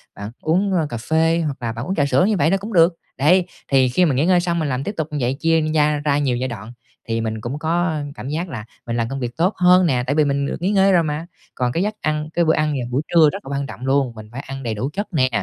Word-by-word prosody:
bạn 100 Hz, +2 st, -7 dB
uống, 185 Hz, +5 st, +1 dB
ơ, 165 Hz, -4 st, +1 dB
cà 120 Hz, -, -4 dB
phê 160 Hz, +7 st, +1 dB
hoặc 145 Hz, -3 st, -3 dB
là 115 Hz, -1 st, -2 dB
bạn 115 Hz, +2 st, -5 dB
uống 190 Hz, -, -2 dB
trà 145 Hz, -, +2 dB
sữa 160 Hz, +5 st, +3 dB
như 210 Hz, 0 st, +1 dB
vậy 165 Hz, -, +2 dB
là 195 Hz, -, +3 dB
cũng 210 Hz, +3 st, -7 dB
được. 170 Hz, -1 st, +5 dB, 0.2 s
Đấy, 175 Hz, +6 st, +4 dB, 0.2 s
thì 130 Hz, -2 st, +3 dB
khi 180 Hz, +9 st, +3 dB
mà 150 Hz, -, +1 dB
nghỉ 140 Hz, +5 st, +2 dB
ngơi 180 Hz, 0 st, +4 dB
xong 170 Hz, -1 st, -1 dB
mình 155 Hz, -3 st, -1 dB
làm 130 Hz, 0 st, -2 dB
tiếp 205 Hz, -, -4 dB
tục 160 Hz, -2 st, -1 dB
như 150 Hz, -, -3 dB
vậy, 125 Hz, +1 st, +1 dB
chia 165 Hz, 0 st, +2 dB
gia 150 Hz, -1 st, +2 dB
ra 145 Hz, -1 st, +1 dB
nhiều 135 Hz, -4 st, 0 dB
giai 130 Hz, +1 st, -2 dB
đoạn 115 Hz, 0 st, -8 dB, 0.3 s
thì 115 Hz, 0 st, -1 dB
mình 110 Hz, -1 st, -3 dB
cũng 130 Hz, +6 st, -4 dB
có, 165 Hz, +3 st, 0 dB
ơ, 160 Hz, -4 st, -1 dB
cảm 130 Hz, -, -7 dB
giác 165 Hz, +4 st, -3 dB
là 115 Hz, -8 st, -6 dB, 0.2 s
mình 115 Hz, -, -3 dB
làm 115 Hz, -1 st, -1 dB
công 135 Hz, +1 st, -4 dB
việc 120 Hz, -2 st, -5 dB
tốt 180 Hz, +5 st, +2 dB
hơn 180 Hz, 0 st, +5 dB
nè, 130 Hz, -7 st, +1 dB
tại 140 Hz, -, 0 dB
vì 155 Hz, -, +4 dB
mình 140 Hz, 0 st, 0 dB
được 145 Hz, -, -4 dB
nghỉ 180 Hz, -, +1 dB
ngơi 195 Hz, -1 st, +4 dB
rồi 175 Hz, -3 st, +4 dB
mà. 150 Hz, +1 st, -3 dB, 0.3 s
Còn 125 Hz, -1 st, 0 dB
cái 170 Hz, +8 st, 0 dB
giấc 210 Hz, +1 st, -1 dB
ăn 155 Hz, 0 st, -1 dB
cái 170 Hz, -, +2 dB
bữa 160 Hz, -, +4 dB
ăn 155 Hz, -, +1 dB
vào 125 Hz, -4 st, -3 dB
buổi 130 Hz, +3 st, +1 dB
trưa 160 Hz, -3 st, +7 dB
rất -, -, -8 dB
là -, -, -8 dB
quan 140 Hz, 0 st, -2 dB
trọng 125 Hz, -1 st, -8 dB
luôn, 135 Hz, -2 st, +1 dB
mình 110 Hz, -1 st, -11 dB
phải 130 Hz, +3 st, -6 dB
ăn 135 Hz, 0 st, -6 dB
đầy 115 Hz, -2 st, -2 dB
đủ 125 Hz, +6 st, -3 dB
chất 205 Hz, +2 st, -3 dB
nè, 130 Hz, -5 st, +2 dB
150 Hz, 310 wpm, -20 LUFS, 130-170 Hz, 0.3 s, trưa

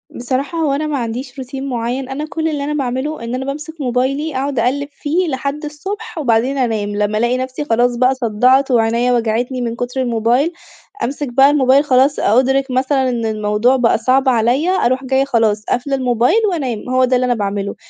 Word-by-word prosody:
بصراحة 265 Hz, +6 st, -3 dB
هو 300 Hz, -4 st, +1 dB
أنا 305 Hz, +2 st, -1 dB
ما 295 Hz, -, -1 dB
عنديش 250 Hz, +3 st, -5 dB
روتين 265 Hz, +1 st, -6 dB
معيّن، 250 Hz, +2 st, -3 dB
أنا 290 Hz, +3 st, -4 dB
كل 320 Hz, -1 st, -2 dB
اللي 295 Hz, -3 st, -2 dB
أنا 300 Hz, +1 st, -2 dB
باعمله، 265 Hz, 0 st, -3 dB
إن 235 Hz, +2 st, -3 dB
أنا 265 Hz, +1 st, -4 dB
بامسك 300 Hz, +3 st, -6 dB
موبايلي، 265 Hz, +4 st, -1 dB
أقعد 270 Hz, 0 st, -1 dB
أقلب 285 Hz, +4 st, 0 dB
فيه، 330 Hz, +6 st, -1 dB
لحد 280 Hz, +2 st, -3 dB
الصبح، 390 Hz, +8 st, -7 dB
وبعدين 255 Hz, 0 st, +1 dB
أنام، 220 Hz, -5 st, -1 dB
لمّا 210 Hz, +1 st, 0 dB
ألاقي 240 Hz, +3 st, +1 dB
نفسي 260 Hz, +3 st, -4 dB
خلاص 240 Hz, 0 st, +2 dB
بقى 255 Hz, +2 st, +2 dB
صدعت، 255 Hz, +3 st, +2 dB
وعينيا 235 Hz, +1 st, +2 dB
وجعتني 240 Hz, +2 st, -1 dB
مِن 235 Hz, -1 st, -2 dB
كتر 245 Hz, +2 st, -3 dB
الموبايل، 240 Hz, +7 st, +1 dB, 0.5 s
أمسك 280 Hz, +2 st, -3 dB
بقى 270 Hz, +2 st, +6 dB
الموبايل 275 Hz, -1 st, +4 dB
خلاص، 270 Hz, +1 st, +3 dB
أ 230 Hz, +4 st, +3 dB
أُدرِك 265 Hz, 0 st, +1 dB
مثلًا 260 Hz, 0 st, +1 dB
إن 235 Hz, -2 st, -2 dB
الموضوع 215 Hz, +3 st, +1 dB
بقى 245 Hz, -3 st, +2 dB
صعب 260 Hz, +4 st, +2 dB
عليَّ، 245 Hz, +8 st, +2 dB
أروح 260 Hz, -8 st, +1 dB
جاية 265 Hz, +1 st, +1 dB
خلاص، 220 Hz, -5 st, +1 dB
قافلة 275 Hz, +3 st, -1 dB
الموبايل، 250 Hz, -, +2 dB
وأنام، 255 Hz, -, -3 dB
هو 255 Hz, 0 st, +3 dB
ده 255 Hz, 0 st, +1 dB
اللي 255 Hz, -, +1 dB
أنا 245 Hz, -, +2 dB
باعمله. 200 Hz, -1 st, -3 dB
260 Hz, 190 wpm, -17 LUFS, 240-280 Hz, 0.5 s, بقى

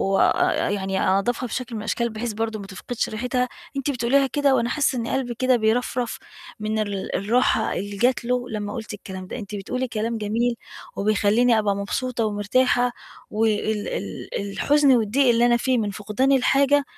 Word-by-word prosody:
وآآ -, -, +2 dB
يعني 195 Hz, -1 st, -1 dB
أنضّفها 240 Hz, +6 st, +1 dB
بشكل 240 Hz, 0 st, -4 dB
من 215 Hz, -, -4 dB
الأشكال 235 Hz, +2 st, -1 dB
بحيث 220 Hz, +1 st, -4 dB
برضه 220 Hz, 0 st, -2 dB
ما 195 Hz, -, -8 dB
تفقدش 220 Hz, +5 st, -4 dB
ريحتها، 250 Hz, +3 st, -1 dB, 0.3 s
أنتِ 275 Hz, +1 st, 0 dB
بتقوليها 270 Hz, +2 st, +2 dB
كده 280 Hz, +1 st, +2 dB
وأنا 235 Hz, -1 st, +1 dB
حاسة 275 Hz, 0 st, +1 dB
إن 230 Hz, -1 st, -2 dB
قلبي 245 Hz, -3 st, -2 dB
كده 255 Hz, +1 st, +3 dB
بيرفرف 240 Hz, +2 st, 0 dB, 0.4 s
من 215 Hz, +1 st, -1 dB
ال 200 Hz, -2 st, -3 dB
الراحة 220 Hz, +2 st, +2 dB
اللي 200 Hz, +1 st, -4 dB
جَت 245 Hz, +2 st, +2 dB
له 250 Hz, 0 st, -1 dB
لمّا 205 Hz, -1 st, -4 dB
قُلتِ 225 Hz, -1 st, -6 dB
الكلام 190 Hz, -2 st, -8 dB
ده، -, -, -6 dB
أنتِ 210 Hz, -2 st, -7 dB
بتقولي 250 Hz, +6 st, -3 dB
كلام 225 Hz, 0 st, -2 dB
جميل، 230 Hz, +3 st, 0 dB, 0.4 s
وبيخليني 215 Hz, +3 st, +3 dB
أبقى 205 Hz, -2 st, +1 dB
مبسوطة 230 Hz, +4 st, -2 dB
ومرتاحة، 245 Hz, +4 st, +2 dB, 0.4 s
وال 215 Hz, -1 st, 0 dB
ال -, -, -5 dB, 0.2 s
الحُزن 290 Hz, +4 st, +3 dB
والضيق 240 Hz, +5 st, +2 dB
اللي 235 Hz, 0 st, +4 dB
أنا 240 Hz, 0 st, +4 dB
فيه 255 Hz, +1 st, +1 dB
من 210 Hz, -3 st, -1 dB
فُقدان 210 Hz, +7 st, 0 dB
الحاجة، 275 Hz, +2 st, +4 dB
230 Hz, 170 wpm, -23 LUFS, 210-250 Hz, 0.4 s, اللي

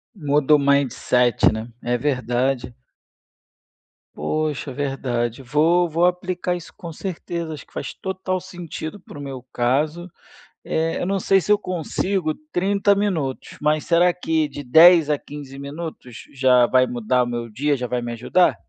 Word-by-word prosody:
Muda 150 Hz, -3 st, +3 dB
o -, -, +3 dB
mindset, 130 Hz, -4 st, +3 dB
né, 110 Hz, +2 st, -5 dB
é 120 Hz, 0 st, 0 dB
verdade. 125 Hz, -1 st, -1 dB, 1.4 s
Poxa, 155 Hz, -3 st, -2 dB
verdade, 130 Hz, -4 st, -2 dB
vou 165 Hz, +7 st, +3 dB
vou 165 Hz, +2 st, +1 dB
aplicar 180 Hz, 0 st, -1 dB
isso, 175 Hz, -, -9 dB
com 170 Hz, -, -8 dB
certeza, 170 Hz, -1 st, -5 dB
acho 150 Hz, -, -9 dB
que -, -, -28 dB
faz -, -, -5 dB
total 185 Hz, -1 st, -3 dB
sentido 175 Hz, 0 st, -7 dB
para 160 Hz, -, -13 dB
o -, -, -7 dB
meu 135 Hz, -3 st, -7 dB
caso, 150 Hz, +8 st, 0 dB, 0.5 s
eh, 160 Hz, +1 st, -1 dB
eu -, -, -1 dB
não 195 Hz, 0 st, 0 dB
sei 195 Hz, +1 st, +3 dB
se 205 Hz, -, -1 dB
eu 210 Hz, -, +6 dB
consigo 185 Hz, -2 st, -2 dB, 0.2 s
30 200 Hz, +2 st, +2 dB
minutos, 170 Hz, -10 st, -2 dB
mas 150 Hz, 0 st, +1 dB
será 175 Hz, +1 st, +4 dB
que 160 Hz, -3 st, 0 dB
de 145 Hz, 0 st, -8 dB
10 160 Hz, +4 st, +7 dB
a 150 Hz, -, +2 dB
15 140 Hz, -2 st, -10 dB
minutos 140 Hz, -4 st, -8 dB
já 130 Hz, -2 st, +4 dB
vai 130 Hz, 0 st, +4 dB
mudar 125 Hz, +1 st, +1 dB
o -, -, -3 dB
meu 120 Hz, -1 st, -4 dB
dia, 145 Hz, +7 st, 0 dB
já 125 Hz, -2 st, -4 dB
vai 125 Hz, 0 st, -2 dB
me 120 Hz, 0 st, -4 dB
ajudar? 125 Hz, +10 st, +2 dB
150 Hz, 160 wpm, -22 LUFS, 130-175 Hz, 1.4 s, 10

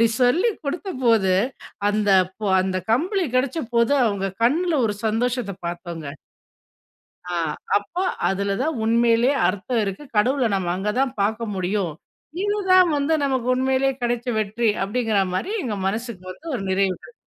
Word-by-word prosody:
அப்டி 230 Hz, -, +5 dB
சொல்லிக் 355 Hz, -, +3 dB
குடுத்தபோது 255 Hz, -, +1 dB, 0.6 s
அந்த 205 Hz, -1 st, +1 dB, 0.3 s
ப 205 Hz, -2 st, 0 dB
அந்த 190 Hz, 0 st, -2 dB
கம்பளி 360 Hz, -, +1 dB
கெடைச்ச 265 Hz, +5 st, 0 dB, 0.2 s
போது 235 Hz, +4 st, +3 dB
அவங்க 200 Hz, -2 st, -1 dB, 0.2 s
கண்ணில 325 Hz, +6 st, +2 dB
ஒரு 205 Hz, -, -2 dB
சந்தோஷத்த 230 Hz, -2 st, -1 dB
பார்த்தோம்ங்க. 170 Hz, -3 st, -6 dB, 1.3 s
ஆ -, -, 0 dB, 0.4 s
அப்போ, 270 Hz, -, -4 dB, 0.3 s
அதில 200 Hz, +1 st, 0 dB
தான் 310 Hz, -1 st, -1 dB
உண்மையிலேயே 235 Hz, +3 st, +3 dB
அர்த்தம் 205 Hz, +6 st, -1 dB
இருக்கு. 195 Hz, +6 st, -4 dB
கடவுளை 255 Hz, +3 st, +3 dB
நம்ம 185 Hz, -2 st, -1 dB
அங்க 200 Hz, +3 st, -1 dB
தான் 270 Hz, -2 st, +2 dB
பார்க்க 220 Hz, +3 st, 0 dB
முடியும். 185 Hz, -1 st, -1 dB, 0.5 s
"இதுதான் 380 Hz, -3 st, +4 dB
வந்து 285 Hz, +3 st, +1 dB
நமக்கு 260 Hz, -3 st, 0 dB
உண்மையிலேயே 265 Hz, +1 st, +1 dB
கெடைச்ச 240 Hz, 0 st, -1 dB
வெற்றி" 215 Hz, +2 st, 0 dB
அப்டிங்கிற 220 Hz, +1 st, 0 dB
மாரி 185 Hz, -, -2 dB
எங்க 215 Hz, -5 st, -3 dB
மனசுக்கு 220 Hz, -2 st, -4 dB
வந்து 320 Hz, -, -13 dB
ஒரு 195 Hz, -, -4 dB
நிறைவு 190 Hz, 0 st, +1 dB
கிடைச்சுது. 485 Hz, -, -15 dB
230 Hz, 140 wpm, -23 LUFS, 200-270 Hz, 1.3 s, அப்டி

